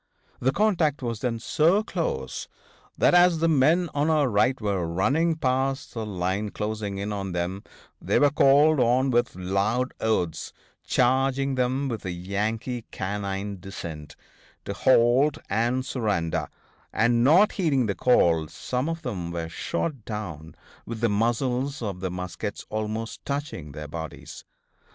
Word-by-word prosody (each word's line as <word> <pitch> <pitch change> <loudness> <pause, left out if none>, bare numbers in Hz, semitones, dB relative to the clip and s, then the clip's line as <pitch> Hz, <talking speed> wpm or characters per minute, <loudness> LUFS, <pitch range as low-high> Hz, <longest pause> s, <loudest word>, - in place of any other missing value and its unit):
The 130 - +2
contact 165 -6 +1
was 115 -2 -3
then 115 -1 -1
so 165 - +2
close 115 - -3 0.5
that - - +4
as 175 -1 +6
the 165 +1 +2
men 160 +4 +3
on 145 +2 +1
our 155 -3 +3
right 125 +4 +2
were 100 -5 -1
running 135 - +1
past 135 -1 -1
the 110 -2 -4
line 95 +2 -2
closing 105 -1 -4
in 100 +1 -3
on 95 -2 -4
them 90 +3 -3 0.4
they - - +1
were 145 -1 +4
called 145 +1 +5
on 130 +2 +3
with 120 -5 +1
loud 100 +7 0
oaths, 90 -8 -1 0.3
charging 135 +2 +2
them 130 +2 0
with 115 -5 -4
a 95 - -4
Yankee 105 +7 -3
canine 100 0 -4
descent, 85 -5 -8 0.5
to 100 - -3
halt 130 +6 +4
and 120 +5 +1
surrender; 105 -12 -1 0.4
and, 120 +1 +2
not 175 +10 +6
heeding 145 - +1
the 100 - 0
call, 85 -10 +3
some 125 - -3
of 165 0 -4
them 90 -9 -4
were 85 -1 -4
shot 135 - -3
down 90 -9 -6 0.3
with 115 -1 -7
the 115 - +3
muzzles 125 +6 0
of 100 -4 -4
the 95 0 -2
muskets 90 +2 -5
almost 110 +1 -4
touching 140 - -4
their 75 0 -7
bodies. 80 +1 -8
115 Hz, 145 wpm, -25 LUFS, 95-135 Hz, 0.5 s, as